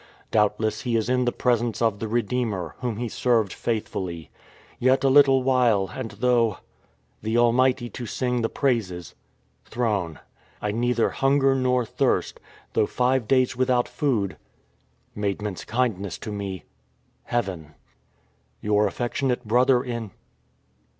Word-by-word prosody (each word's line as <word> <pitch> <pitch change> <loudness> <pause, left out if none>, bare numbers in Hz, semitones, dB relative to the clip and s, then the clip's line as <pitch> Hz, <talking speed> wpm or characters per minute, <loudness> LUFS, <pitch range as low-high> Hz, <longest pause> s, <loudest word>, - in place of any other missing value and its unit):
Doubtless 105 0 +1
he 120 -1 -1
is 115 +1 0
in 125 0 +2
the 120 - +2
presence 120 -2 0
of 110 -3 +1
the 110 - -3
Redeemer, 110 -6 -1
Whom 120 -4 -3
he 120 +1 -2
served 115 -3 +1
faithfully. 95 -7 -4 0.5
Yet 130 +2 +3
a 135 - +4
little 135 -2 +6
while, 120 -7 +2
and 130 -4 -5
though... 120 -3 +1 0.6
the 110 +2 -1
Almighty 120 +1 +3
to 120 - -6
sing 125 0 -1
the 115 - 0
praises... 95 - -1 0.5
throne. 105 -9 -2 0.4
I 105 - -2
neither 120 +1 +1
hunger 135 0 +3
nor 125 -2 +1
thirst, 125 +3 0 0.3
though 105 - +2
five 125 -2 +1
days 130 -1 +2
without 125 -1 +2
food.... 115 -10 -1 0.8
Maidmcnt's 105 -1 -3
kindness 110 -6 -1
to 110 - -7
me.,. 100 -3 -5 0.6
heaven. 90 -10 -3 0.4
" 60 +1 -41
Your 105 0 +2
affectionate 125 +3 -2
brother 125 +2 +4
in 115 -4 -4
120 Hz, 130 wpm, -24 LUFS, 105-125 Hz, 0.8 s, little